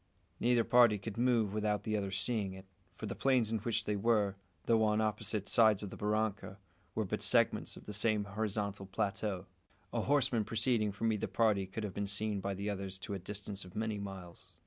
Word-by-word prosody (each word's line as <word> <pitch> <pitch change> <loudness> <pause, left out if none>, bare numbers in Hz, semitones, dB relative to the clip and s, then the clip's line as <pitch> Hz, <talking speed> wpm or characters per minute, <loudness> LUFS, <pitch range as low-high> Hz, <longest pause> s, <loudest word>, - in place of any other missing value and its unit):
Neither 120 -1 +3
party 120 -3 +5
could 100 +1 -6
move 120 -5 +2
without 105 -1 0
the 110 0 -1
other 100 -2 -1
seeing 100 +1 -1
it; 95 0 -11 0.3
for - - -8
the - - -3
plains 125 -5 +2
in 110 - 0
which 115 +2 -1
they 105 - 0
were, 105 -2 +2 0.3
though 115 -1 +4
on 105 0 +2
opposite 105 -1 0
sides 110 -4 +4
of 100 - -5
the - - -7
barranca, 105 -1 -1 0.4
were - - 0
but - - -3
segments - - +2
of - - -12
the 105 - -6
same 105 0 +2
horizontal 100 -1 -3
plateau. 100 -1 -2 0.5
A - - +1
horseman 130 -5 +2
proceeding 110 0 +1
from 110 +3 0
either 105 - -2
party 100 -1 +2
could 100 +4 -5
have 100 -3 -4
been 100 +1 -2
seen 105 0 -2
by 100 0 -2
the 100 +2 -4
others 95 -2 -3
to 100 +2 -6
a 100 - -3
distance 100 +1 -6
of 90 -1 -13
many 110 -1 -1
miles. 95 -4 -9
105 Hz, 205 wpm, -34 LUFS, 100-110 Hz, 0.5 s, party